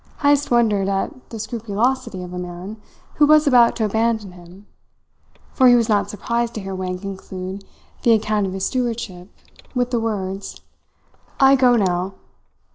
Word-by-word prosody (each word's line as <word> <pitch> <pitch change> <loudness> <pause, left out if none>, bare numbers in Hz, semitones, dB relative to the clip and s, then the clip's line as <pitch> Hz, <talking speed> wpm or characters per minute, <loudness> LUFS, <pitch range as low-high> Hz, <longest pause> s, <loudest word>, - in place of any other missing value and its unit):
Heyst 285 0 +3
wondered 215 -5 +2
at 250 +8 -3
the 225 - -7
scrupulosity 230 0 -2
of 180 0 -9
a 180 - -4
man 180 +4 -8 0.4
who 295 - +5
was 305 0 +5
about 245 -4 +5
to 220 - 0
abandon 220 -1 0
him; 180 +3 -15 0.9
for 260 - +5
he 245 - +7
was 230 -1 +2
not 205 -2 +2
surprised 235 +3 -2
to 215 - -4
hear 195 0 -6
Wang 185 -1 -3
conclude 190 0 -7 0.4
the 235 - +4
account 215 -2 +1
of 185 - -5
his 190 0 -2
stewardship 230 -8 -3 0.5
with 245 0 0
the 240 - +1
words: 200 -3 -4 0.8
"I 270 0 +6
go 250 -2 +4
now." 185 -2 0
215 Hz, 160 wpm, -21 LUFS, 190-240 Hz, 0.9 s, he